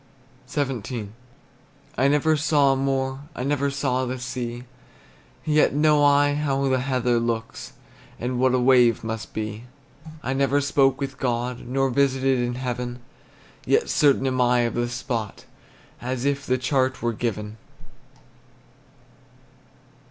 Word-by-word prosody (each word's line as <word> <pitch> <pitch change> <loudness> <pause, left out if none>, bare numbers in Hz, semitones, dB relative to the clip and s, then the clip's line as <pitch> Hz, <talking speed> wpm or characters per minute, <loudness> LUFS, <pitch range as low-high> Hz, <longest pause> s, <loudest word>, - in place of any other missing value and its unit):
XVII. 125 -6 -3 0.9
I 135 - +2
never 150 +2 +3
saw 145 -2 +3
a - - 0
moor, 135 0 -1 0.2
I 125 - -4
never 140 0 0
saw 135 -2 -1
the 130 +1 -3
sea; 120 -1 -5 0.8
Yet 150 -2 +3
know 150 0 +4
I 145 0 +4
how 140 -2 0
the 130 -1 +2
heather 125 -2 +1
looks, 115 -1 -4 0.5
And 125 +1 -2
what 130 0 +3
a - - +2
wave 125 -3 +4
must 115 0 -5
be. 110 +1 -4 0.6
I 130 - -1
never 140 +1 +2
spoke 135 -2 +2
with 135 -1 -5
God, 120 -1 -2
Nor 135 +1 0
visited 135 0 +2
in 120 0 -1
heaven; 125 -1 -4 0.7
Yet 455 +1 +1
certain 140 -3 +3
am 130 -1 0
I 125 0 +3
of 120 -1 -1
the 120 0 -1
spot 120 -3 -4 0.6
As 125 +1 -3
if 140 0 -1
the 130 - +2
chart 130 0 0
were 120 0 0
given. 105 -1 -4
130 Hz, 135 wpm, -24 LUFS, 120-140 Hz, 0.9 s, know